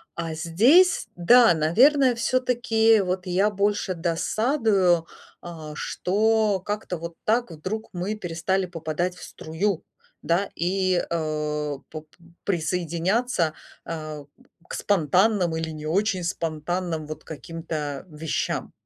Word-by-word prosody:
а 165 -1 -3
здесь 230 - +4
да, 230 +4 +6
наверное, 250 - +4
всё-таки 230 -2 +2
вот 185 0 -2
я 190 +3 +2
больше 205 -1 0
досадую, 185 - +1 0.4
а, 160 -3 -8
что 210 +3 +1
как-то 205 -4 -3
вот 170 +1 -7
так 230 -2 +1
вдруг 185 +8 -5
мы 185 +4 -2
перестали 185 0 -1
попадать 175 +1 -3
в - - -12
струю, 165 +3 -3 0.4
да, 175 +4 0
и, 185 0 +1
э, 150 -2 -2
поп 155 0 -8 0.4
присоединяться, 175 +2 0 0.3
а, 155 -3 -6 0.4
к - - -8
спонтанным 185 0 +2
или 160 0 -2
не 155 -1 -7
очень 190 +2 0
спонтанным, 165 0 -3
вот, 155 - -7
каким-то 155 0 -5
вещам. 155 0 -3
180 Hz, 110 wpm, -25 LUFS, 160-210 Hz, 0.4 s, да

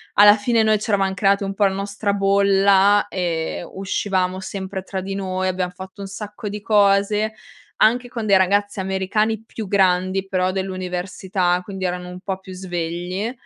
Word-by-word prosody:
alla 205 +1 +8
fine 230 +1 +2
noi 215 0 +3
c'eravam 195 -3 0
creati 200 0 +2
un 195 0 -3
po' 205 - +3
la 195 - +2
nostra 200 +1 -2
bolla, 200 0 +4
ehm, 170 -3 -3
uscivamo 190 -1 -1
sempre 190 0 -5
tra 190 0 -4
di 195 +1 -5
noi, 185 -1 -2
abbiam 180 -1 -1
fatto 190 +2 -10
un 195 - -5
sacco 210 +1 -7
di 210 0 -6
cose, 205 +1 +2 0.4
anche 245 +3 +3
con 230 -3 -4
dei 195 -2 +6
ragazzi 205 +2 +1
americani 195 +3 -1
più 225 -1 -7
grandi 185 0 +2
però, 185 -1 0
dell'università 185 -1 -2
quindi 190 -1 -5
erano 180 0 -3
un 180 - -8
po' 190 -2 -3
più 190 -1 -11
svegli, 180 +3 -3
195 Hz, 165 wpm, -21 LUFS, 185-205 Hz, 0.4 s, alla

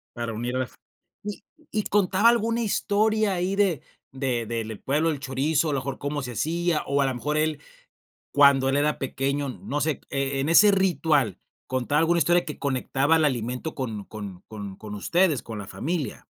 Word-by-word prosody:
Para 115 -1 -3
unirlas, 125 +3 -3 0.5
¿y 205 0 -6 0.3
y 215 - 0
contaba 200 +1 +3
alguna 230 0 +1
historia 215 -1 +1
ahí 185 +2 -1
de 195 -8 +2 0.3
de 130 -3 -1
del 110 -1 -4
pueblo 150 +4 +1
del 150 -3 -2
chorizo?, 140 +3 0
a - - 0
lo 140 - +1
mejor 135 +1 -4
cómo 145 +1 -3
se 125 -2 -5
hacía, 165 +5 0
o 140 0 +1
a - - +3
lo 130 -1 -1
mejor, 150 +5 -2
él 155 -1 0 0.7
cuando 140 -2 +6
él 135 - +2
era 150 +1 +1
pequeño, 140 +1 -2
no 140 +3 -4
sé, 155 -1 0
e 135 0 -1
en 140 - -1
ese 205 +5 +7
ritual, 160 - +2 0.3
¿contaba 130 +3 0
alguna 170 +1 +3
historia 175 +3 +3
que 150 - -7
conectaba 140 +3 +1
el 160 - +3
alimento 125 +2 -2
con 110 -7 -4
con 100 -4 -8
con 100 -3 -7
con 105 0 -8
ustedes, 170 - +2
con 115 -2 -6
la 100 - -9
familia? 150 0 -4
145 Hz, 185 wpm, -25 LUFS, 130-170 Hz, 0.7 s, ese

